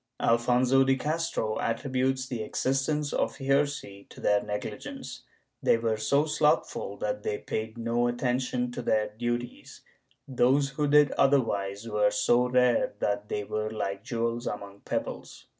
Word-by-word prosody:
Alfonso 125 +3 +3
de 135 0 +3
Castro 150 -7 -2
attributes 130 +2 -1
the 120 -4 -4
existence 135 +6 -1
of - - -1
heresy 135 -7 -1
to - - -13
their 105 0 +2
negligence; 105 0 -6 0.4
they - - +4
were 115 -1 0
so 140 +8 +2
slothful 150 -1 0
that - - -2
they 440 -1 -2
paid 110 - -4
no 120 +1 0
attention 125 0 -1
to 125 - -5
their 110 -2 +1
duties; 120 +3 -4 0.5
those 135 +2 +3
who 145 +2 -1
did 145 -1 +5
otherwise 105 -6 +1
were 105 -1 +2
so 120 +4 +2
rare 125 -4 +2
that 105 0 -2
they 105 - -2
were 110 +1 -3
like 100 -2 -4
jewels 115 0 -2
among 100 -1 -6
pebbles. - - -5
120 Hz, 140 wpm, -28 LUFS, 110-135 Hz, 0.5 s, did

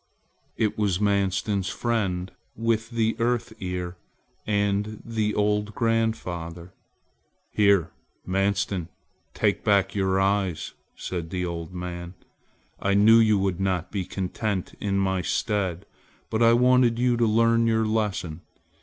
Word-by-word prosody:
It 110 -1 0
was 100 -4 +1
Manstin's 100 -1 0
friend 95 -6 -1 0.2
with 115 0 0
the 115 -2 0
Earth 120 -1 0
Ear 90 -1 -4 0.5
and 105 0 0
the 110 -2 -1
old 105 0 0
grandfather. 90 -7 -2 0.8
"Here 100 -5 +3 0.3
Manstin, 95 -1 0 0.5
take 105 -2 +1
back 100 -3 +2
your 95 -1 +1
eyes," 95 -5 0 0.2
said 85 -3 -5
the 90 +1 -2
old 85 -1 -5
man, 90 0 -6 0.6
"I 100 0 +1
knew 110 +3 +7
you 110 -2 +4
would 95 -2 -1
not 95 -3 -1
be 100 -3 -2
content 95 +1 -3
in 100 -1 -1
my 95 -1 +1
stead, 95 0 -1 0.5
but 110 - 0
I 115 0 +6
wanted 125 -1 +4
you 125 0 +2
to 115 -1 +3
learn 115 +1 +3
your 110 -1 +2
lesson. 95 -7 -2
100 Hz, 130 wpm, -25 LUFS, 90-110 Hz, 0.8 s, knew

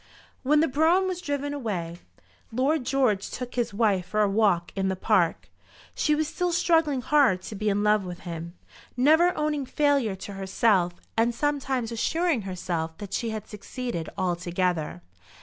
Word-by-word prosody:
When 295 +3 +3
the 325 - +3
brougham 325 +7 +3
was 365 -1 -3
driven 285 -3 -2
away 180 -11 -4 0.5
Lord 260 +3 0
George 255 -8 +1
took 250 -1 -6
his 240 -2 -1
wife 200 -4 +1
for 215 +3 0
a 210 - +4
walk 195 -5 +2
in 190 -1 0
the 190 - 0
park. 185 -3 +1 0.5
She 300 - +1
was 310 0 0
still 350 +3 -1
struggling 325 -6 +2
hard 255 -10 +3
to - - -7
be 210 +1 -1
in 205 +1 +1
love 210 -1 +3
with 180 -1 -7
him, 170 0 -7 0.4
never 315 +7 +5
owning 300 -3 -1
failure 280 -9 +1
to 195 +2 -8
herself, 190 -2 +1 0.2
and 230 +1 +2
sometimes 265 -4 -1
assuring 320 +4 0
herself 165 -3 -3
that 200 -1 -8
she 230 +3 -1
had 215 -1 -5
succeeded 210 -4 -5
altogether. 175 - -1
225 Hz, 165 wpm, -26 LUFS, 190-285 Hz, 0.5 s, never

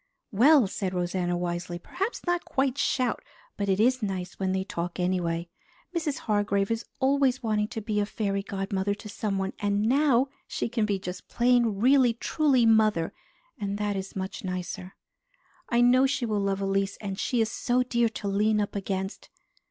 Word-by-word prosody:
"Well," 260 +5 +6
said 190 -1 -3
Rosanna 175 0 -1
wisely, 175 0 -3
"perhaps 390 - -4
not 350 -1 0
quite 265 -1 0
shout, 255 -2 +1 0.3
but 200 -1 -2
it 190 0 +2
is 255 +3 +3
nice 185 -4 -4
when 190 -1 0
they 190 0 0
talk 175 -2 -4
anyway. 175 -2 0 0.5
Mrs. 310 -4 -1
Hargrave 205 -1 +1
is 225 0 -2
always 270 -1 +2
wanting 210 -2 +1
to 225 -1 -5
be 210 0 -1
a 205 - 0
fairy 200 -2 -1
godmother 195 0 -2
to 210 +1 -10
someone, 195 -2 -2
and 205 0 +1
now 265 +1 +3 0.2
she - - -2
can 225 -2 0
be 200 -2 +1
just 185 -1 -7
plain 240 -3 +3
really 255 0 +5
truly 260 +1 +2
mother, 215 -7 +3 0.5
and 200 0 -2
that 205 -1 -1
is 195 0 -5
much 190 0 -5
nicer. 185 0 -5 0.7
I 240 -1 +3
know 255 +2 +5
she 270 -2 -1
will 215 -2 0
love 195 0 -1
Elise, 195 0 0
and 195 -2 -5
she 245 - 0
is 220 -1 +1
so 250 +1 +1
dear 235 -2 +1
to 215 -2 -6
lean 210 +2 +2
up 205 0 -2
against. 195 -1 -4
205 Hz, 175 wpm, -27 LUFS, 190-240 Hz, 0.7 s, Well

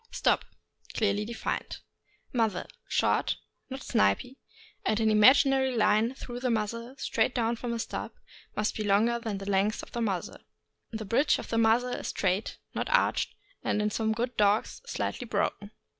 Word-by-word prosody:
Stop. - - +1 0.2
— - - -19
Clearly 210 -1 +1
defined. 230 +1 -3 0.6
Muzzle. 220 -7 +1 0.2
— - - -47
Short, - - +2 0.3
not 265 0 -6
snipy, 100 - +1 0.5
and 215 - +1
an 220 -1 +3
imaginary 265 +4 +5
line 220 +3 +3
through 245 -2 -7
the 250 0 -1
muzzle, 230 +3 -2
straight 260 - 0
down 235 -1 +1
from 240 +1 -5
the 235 - -1
stop, 225 - -5 0.4
must 210 0 0
be 215 - -2
longer 215 +4 +3
than 220 -4 -3
the 195 0 -7
length 200 +2 +1
of - - -11
the 235 - -3
muzzle. 195 -6 -2 0.5
The 220 -1 -5
bridge 255 +9 +3
of - - -8
the 225 - +1
muzzle 230 +2 +3
is - - -4
straight, 190 +2 -1 0.2
not - - -2
arched, - - +2 0.3
and, - - 0
in 210 0 +1
some 220 +1 0
good 240 +3 -2
dogs, 210 +1 +2
slightly - - -3
broken. 205 - -1
225 Hz, 175 wpm, -29 LUFS, 210-240 Hz, 0.6 s, imaginary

